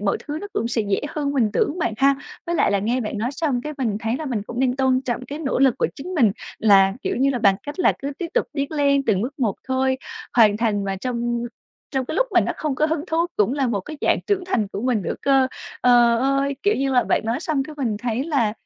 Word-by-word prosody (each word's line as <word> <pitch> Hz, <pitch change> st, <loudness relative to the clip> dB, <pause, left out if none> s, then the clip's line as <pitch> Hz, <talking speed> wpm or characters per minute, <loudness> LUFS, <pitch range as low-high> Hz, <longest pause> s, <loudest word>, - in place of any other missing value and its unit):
mọi 200 Hz, -1 st, +1 dB
thứ 300 Hz, 0 st, -3 dB
nó 410 Hz, -, -5 dB
cũng 230 Hz, -, -1 dB
sẽ 230 Hz, -2 st, 0 dB
dễ 195 Hz, -, +1 dB
hơn 290 Hz, -2 st, -2 dB
mình 235 Hz, -6 st, +2 dB
tưởng 295 Hz, +9 st, 0 dB
bạn 235 Hz, -, 0 dB
ha. 275 Hz, +2 st, +4 dB, 0.3 s
Với 345 Hz, -, -1 dB
lại -, -, +3 dB
là, 200 Hz, -, +2 dB
nghe 235 Hz, +6 st, 0 dB
bạn 215 Hz, -2 st, -4 dB
nói 240 Hz, +4 st, -1 dB
xong 280 Hz, -5 st, -1 dB
cái 300 Hz, +3 st, -5 dB
mình 225 Hz, -6 st, 0 dB
thấy 225 Hz, +2 st, -1 dB
là 310 Hz, -, -5 dB
mình 230 Hz, -7 st, -2 dB
cũng 235 Hz, +4 st, -5 dB
nên 255 Hz, -1 st, +1 dB
tôn 260 Hz, -1 st, +2 dB
trọng 250 Hz, -1 st, -3 dB
cái 285 Hz, +4 st, -6 dB
nỗ 275 Hz, -5 st, -1 dB
lực 265 Hz, -3 st, +4 dB
của -, -, +2 dB
chính 365 Hz, +7 st, -7 dB
mình, 230 Hz, -, +4 dB, 0.3 s
là 195 Hz, -3 st, +5 dB
kiểu -, -, -1 dB
như, 275 Hz, +2 st, +3 dB
bằng 195 Hz, -2 st, +5 dB
cách 290 Hz, +4 st, -7 dB
là 365 Hz, -, +4 dB
cứ 280 Hz, +1 st, -4 dB
tiếp 350 Hz, -, -3 dB
tục -, -, +2 dB
tiến 280 Hz, +1 st, -3 dB
lên 280 Hz, -2 st, +2 dB
từng 205 Hz, -2 st, +2 dB
bước 275 Hz, +5 st, -5 dB
một 225 Hz, -7 st, +1 dB
thôi, 260 Hz, 0 st, +1 dB, 0.4 s
hoàn 210 Hz, -3 st, +6 dB
thành 210 Hz, -3 st, 0 dB
mà 195 Hz, -1 st, -2 dB
trong 240 Hz, +1 st, -2 dB, 0.5 s
trong 265 Hz, -2 st, -1 dB
cái -, -, -5 dB
lúc -, -, +2 dB
mình 360 Hz, -, +4 dB
nó -, -, -1 dB
không 300 Hz, -3 st, -2 dB
có 305 Hz, +3 st, +2 dB
hứng 315 Hz, 0 st, -2 dB
thú 330 Hz, +2 st, +1 dB
cũng 210 Hz, +3 st, +2 dB
là 275 Hz, -1 st, 0 dB
một 210 Hz, -5 st, -1 dB
cái 305 Hz, +10 st, -9 dB
dạng -, -, +2 dB
trưởng 390 Hz, -3 st, 0 dB
thành 240 Hz, -, 0 dB
của 200 Hz, -, -5 dB
mình 240 Hz, -4 st, 0 dB
nữa -, -, -2 dB
cơ. 270 Hz, -1 st, +4 dB, 0.3 s
Ờ 240 Hz, -1 st, +5 dB
ơi, 275 Hz, +1 st, +1 dB
kiểu 410 Hz, +1 st, +3 dB
như 270 Hz, 0 st, 0 dB
là, 250 Hz, -, +4 dB
bạn -, -, +2 dB
nói 230 Hz, +5 st, -1 dB
xong 310 Hz, -5 st, 0 dB
cái, 305 Hz, +2 st, -9 dB
mình 230 Hz, -6 st, -1 dB
thấy 245 Hz, +3 st, -2 dB
là 265 Hz, -10 st, +1 dB
260 Hz, 270 wpm, -22 LUFS, 225-285 Hz, 0.5 s, hoàn